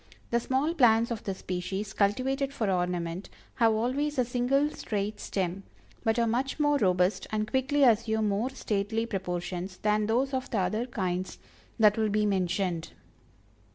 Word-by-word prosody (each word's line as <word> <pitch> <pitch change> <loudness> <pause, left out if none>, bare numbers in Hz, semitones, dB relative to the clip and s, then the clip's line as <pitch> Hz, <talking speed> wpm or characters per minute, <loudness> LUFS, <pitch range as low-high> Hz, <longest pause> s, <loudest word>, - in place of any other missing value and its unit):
The 235 - +3
small 265 +7 0
plants 235 -6 +4
of 230 - -4
this 195 -2 -3
species, 190 +3 -4
cultivated 265 +7 +1
for 220 -7 -1
ornament, 175 0 -2 0.3
have 230 -2 +4
always 265 +7 -1
a 250 - +3
single, 255 +5 +1
straight 210 -4 -3
stem; 190 -1 -2 0.4
but 225 0 +1
are 235 - +3
much 255 +6 -1
more 290 -1 +3
robust, 180 -1 +2
and 215 0 -1
quickly 265 +4 +1
assume 220 -3 +3
more 205 +6 0
stately 220 -3 -1
proportions 185 -2 -4
than 210 0 +1
those 260 +5 +1
of 260 0 -2
the 225 - -1
other 215 +6 0
kinds 185 -6 -3 0.4
that 215 -1 +5
will 220 -1 +2
be 210 +1 +1
mentioned. 185 -3 -1
215 Hz, 155 wpm, -28 LUFS, 195-250 Hz, 0.4 s, that